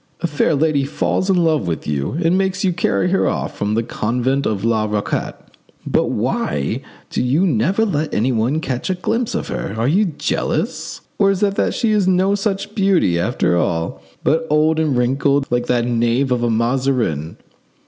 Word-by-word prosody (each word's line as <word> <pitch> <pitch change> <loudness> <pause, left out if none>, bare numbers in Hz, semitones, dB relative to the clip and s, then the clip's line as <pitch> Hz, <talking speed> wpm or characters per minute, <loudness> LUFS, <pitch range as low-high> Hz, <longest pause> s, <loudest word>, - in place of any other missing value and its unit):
A - - -1
fair 155 0 +1
lady 145 -1 +2
falls 155 +6 -1
in 190 - +4
love 155 - +1
with 80 -2 -3
you 70 - -2
and 165 +2 +3
makes 190 0 0
you 185 -2 +2
carry 175 +1 0
her 195 - +2
off - - -2
from 105 +1 -1
the 115 - +1
convent 125 +5 -1
of 105 -2 -2
La 110 -2 +2
Raquette. 105 -1 -2 0.5
But - - +1
why 70 -1 -1 0.3
do - - -1
you 135 +9 +2
never 180 - +2
let 155 -6 -1
anyone 120 +6 0
catch 130 -1 -3
a 185 - +1
glimpse 225 +6 -1
of - - -3
her? 100 - -4
Are 115 +2 0
you 190 +9 +3
jealous? 160 -6 -2 0.2
Or 200 -1 +4
is 195 +1 0
it 200 -1 +2
that - - 0
she 230 -3 +1
is 205 -3 +2
no 190 +1 +3
such 200 0 -2
beauty, 190 - +2
after 100 -2 +1
all, 85 -1 -1 0.2
but 160 +1 +1
old 155 +1 +3
and 150 -5 +1
wrinkled, 135 +3 +1
like 120 0 0
that 120 -1 +1
knave 120 +2 +1
of 125 -1 +1
a 120 - +1
Mazarin?" 115 - 0
140 Hz, 190 wpm, -19 LUFS, 115-180 Hz, 0.5 s, in